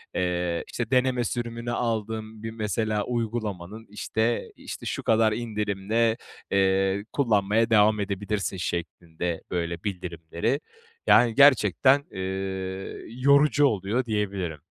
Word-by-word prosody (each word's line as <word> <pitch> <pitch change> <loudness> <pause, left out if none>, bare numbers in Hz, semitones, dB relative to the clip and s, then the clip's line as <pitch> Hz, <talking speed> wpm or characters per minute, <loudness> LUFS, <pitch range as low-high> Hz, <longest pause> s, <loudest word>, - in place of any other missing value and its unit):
eee, 90 -1 -1 0.3
deneme 125 -1 +2
sürümünü 120 0 -3
aldığım 110 -2 -3
bir 115 - -4
mesela 110 -1 -1
uygulamanın, 110 -3 -4
işte, 110 +3 -1
işte, - - -8
şu - - -3
kadar 110 -1 +3
indirimde, 110 0 0 0.3
eee, 95 0 +2
kullanmaya 110 -3 +2
devam 105 -1 +4
edebilirsin 100 0 -2
şeklinde, 85 0 -4
böyle, 85 -1 -2
bildirimleri. 90 - -2 0.5
Yani, 120 -2 +5
gerçekten, 135 0 +5
eee, 95 - -6 0.9
yorucu 140 +4 +4
oluyor 110 +1 0
diyebilirim. 100 -7 -2
105 Hz, 100 wpm, -26 LUFS, 95-115 Hz, 0.9 s, Yani